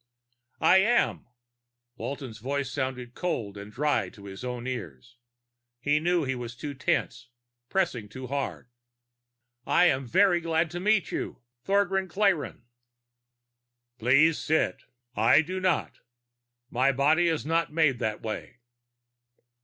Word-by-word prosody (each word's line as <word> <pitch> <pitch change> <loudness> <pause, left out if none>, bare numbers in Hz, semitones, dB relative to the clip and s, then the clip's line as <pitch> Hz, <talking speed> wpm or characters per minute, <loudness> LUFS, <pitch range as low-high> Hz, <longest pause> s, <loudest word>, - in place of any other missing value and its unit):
"I - - +6
am." 225 - +2 0.7
Walton's 130 -5 -6
voice 135 +3 -2
sounded 130 -3 -3
cold 115 - -3
and 100 +1 -9
dry 125 -6 0
to 100 +2 -15
his 95 +3 -9
own 125 -1 -4
ears. 120 - -6 0.6
He 145 +4 +2
knew 175 +1 +1
he 130 -1 -1
was 120 -1 -6
too 145 +3 -6
tense, 125 -2 -2 0.4
pressing 130 - -1
too 130 +4 -8
hard. 135 -2 -4 1.0
"I'm 140 -3 +3
very 180 - +4
glad 165 0 0
to 175 - -4
meet 205 0 +2
you, - - -4 0.2
Thogran 195 -1 +1
Klayrn." 180 - 0 1.4
"Please 140 +7 +4
sit. 160 +1 0 0.3
I 120 +8 +5
do 185 +4 -4
not. 185 -4 0 0.7
My 130 +3 +3
body 150 +6 +3
is 160 -3 0
not 165 +1 +1
made 150 -6 +2
that 110 -1 -2
way." 110 +1 -5
140 Hz, 125 wpm, -27 LUFS, 125-170 Hz, 1.4 s, I